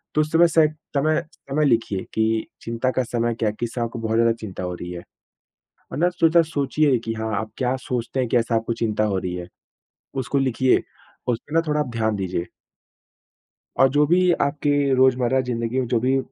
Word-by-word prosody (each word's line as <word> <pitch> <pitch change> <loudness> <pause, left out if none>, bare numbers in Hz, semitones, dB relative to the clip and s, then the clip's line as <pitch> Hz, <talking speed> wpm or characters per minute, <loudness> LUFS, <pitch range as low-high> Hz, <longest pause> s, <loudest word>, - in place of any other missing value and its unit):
तो 155 - +4
उस 155 0 -2
समय 170 +1 +6
से 160 -1 +4 0.3
समय 155 +2 +2 0.3
समय 150 +2 +2
लिखिए 115 -7 +1
कि 110 0 +1
चिंता 115 +2 -1
का 130 - 0
समय 120 -1 -1
क्या 110 - +2
है? 105 - -6
किस 120 -1 -3
से 120 - -2
आपको 115 0 -3
बहुत 110 0 -1
ज़्यादा 115 0 +4
चिंता 95 -4 -6
हो 90 0 -3
रही 90 0 -7
है। 85 0 -7 0.9
और - - -4
ना 175 - +4
सोचा 170 -1 +4
सोचिए 150 -2 +1
कि 115 - -2
हाँ, 110 -1 -3
आप 110 - -6
क्या 130 0 0
सोचते 125 +1 -3
हैं, 125 - -1
कैसे 115 0 +1
आपको 115 +1 0
चिंता 110 -1 +1
हो 100 -3 0
रही 90 -1 -3
है? 90 0 -7 0.7
उसको 140 +2 -2
लिखिए, 130 -1 +2 0.4
उसपे 125 +5 -3
ना 165 - +5
थोड़ा 150 0 +1
आप 145 - -3
ध्यान 110 -2 0
दीजिए। 95 -3 -2 1.4
और 135 - +7
जो 145 +2 +3
भी 180 +3 +4
आपके 145 +1 0 0.2
रोज़मर्रा 130 0 +3
ज़िंदगी 120 -1 -2
में 125 - -2
जो 120 - +2
भी 130 +3 +2
120 Hz, 200 wpm, -23 LUFS, 110-140 Hz, 1.4 s, और